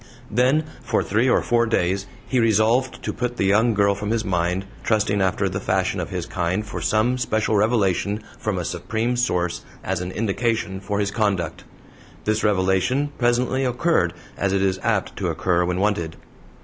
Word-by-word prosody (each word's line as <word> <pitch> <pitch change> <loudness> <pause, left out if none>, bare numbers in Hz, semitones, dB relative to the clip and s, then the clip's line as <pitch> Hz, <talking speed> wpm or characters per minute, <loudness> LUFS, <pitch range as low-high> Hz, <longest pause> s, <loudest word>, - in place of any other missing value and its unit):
Then 130 +7 +3 0.2
for - - 0
three 115 +5 +2
or - - +3
four 115 -1 +2
days 95 -2 0 0.2
he 130 - +1
resolved 115 +3 +2
to - - -2
put 125 -1 -3
the - - +1
young 110 +4 +3
girl 100 0 +3
from 100 +1 -4
his 115 -1 0
mind, 90 0 0 0.2
trusting 105 -2 +1
after 95 +1 +1
the 95 +1 -3
fashion 95 -1 0
of 90 - -3
his 90 -3 -3
kind 90 +4 -1
for - - -6
some 120 +4 +1
special 110 -2 0
revelation 105 -1 +1 0.2
from - - -2
a - - -2
supreme 115 +3 -2
source 90 -8 0 0.2
as 95 -1 -2
an 90 0 -4
indication 110 -1 -1
for 100 +1 -2
his 100 -1 0
conduct. 100 -7 -1 0.6
This 110 +1 +1
revelation 105 +8 +2
presently 125 +2 +2
occurred, 125 - +1 0.2
as 100 -1 0
it 95 0 +2
is 95 -1 +1
apt - - 0
to - - -1
occur 90 -1 +1
when 90 +1 -1
wanted. 95 -6 0
105 Hz, 175 wpm, -23 LUFS, 95-115 Hz, 0.6 s, Then